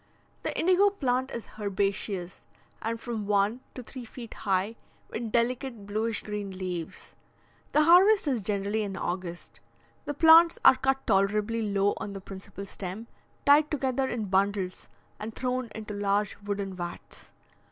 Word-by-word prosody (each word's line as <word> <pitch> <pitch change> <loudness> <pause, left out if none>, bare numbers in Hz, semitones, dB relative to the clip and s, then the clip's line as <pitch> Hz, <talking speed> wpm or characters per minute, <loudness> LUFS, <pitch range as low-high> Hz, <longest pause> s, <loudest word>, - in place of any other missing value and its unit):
The - - -3
indigo 370 +4 +5
plant 260 -9 -1
is 235 - -6
herbaceous, 195 -2 -2 0.4
and 230 +1 -2
from 225 -4 -4
one 205 +3 +2 0.2
to 255 - -7
three 255 +2 -8
feet 235 0 -9
high, 195 +3 -1 0.4
with 225 -1 -4
delicate 240 -1 -1
bluish 215 +2 -2
green 210 -1 -4
leaves. 180 -3 -5 0.6
The 305 - +5
harvest 365 +4 +6
is 255 -6 +1
generally 205 +2 -1
in 195 -2 -4
August; 175 -2 -5 0.5
the 290 - -3
plants 330 +2 +7
are - - +10
cut 270 +1 0
tolerably 210 +3 +2
low 200 -1 +1
on 200 - -5
the 195 - -6
principal 195 +1 -9
stem, 195 +3 -6 0.4
tied 295 +1 +6
together 265 -2 0
in 230 -3 -2
bundles, 195 -1 0 0.3
and 220 +1 -6
thrown 255 -1 -2
into 215 -1 -6
large 205 0 0
wooden 200 -1 -3
vats. 175 -1 -8
215 Hz, 145 wpm, -28 LUFS, 195-255 Hz, 0.6 s, are